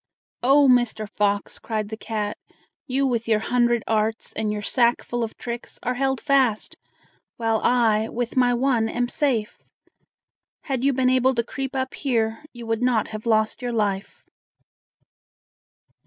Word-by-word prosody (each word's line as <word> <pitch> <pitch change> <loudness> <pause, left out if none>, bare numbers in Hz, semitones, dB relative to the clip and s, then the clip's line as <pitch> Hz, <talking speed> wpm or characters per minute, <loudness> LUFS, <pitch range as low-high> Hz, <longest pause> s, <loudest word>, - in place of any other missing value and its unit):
"Oh, 275 +3 +5
Mr. 240 -4 +2
Fox!" 205 -1 -1
cried 215 -2 -3
the 220 - -4
cat, 215 -2 -3 0.5
"you 270 +1 +1
with 235 -3 -1
your 220 -2 +3
hundred 240 +1 +1
arts, 220 0 -1
and 215 -1 -2
your 210 0 -4
sackful 240 +1 +1
of 225 - -5
tricks, 240 0 -6
are 250 - 0
held 265 0 0
fast, 265 -6 +1 0.6
while 225 -2 0
I, 225 -3 +3
with 240 0 -3
my 250 -1 +4
one, 240 -3 +1
am 245 +1 -1
safe. 240 -5 -1 1.0
Had 265 -3 -2
you 280 - +4
been 255 -1 +2
able 260 0 +3
to 235 - +1
creep 270 +3 -5
up 260 0 -2
here, 225 -3 -1
you 240 -1 -10
would 225 0 -1
not 245 -4 +1
have 215 +1 -7
lost 220 0 +1
you 245 -1 -2
life." 210 - -2
235 Hz, 155 wpm, -23 LUFS, 220-255 Hz, 1.0 s, Oh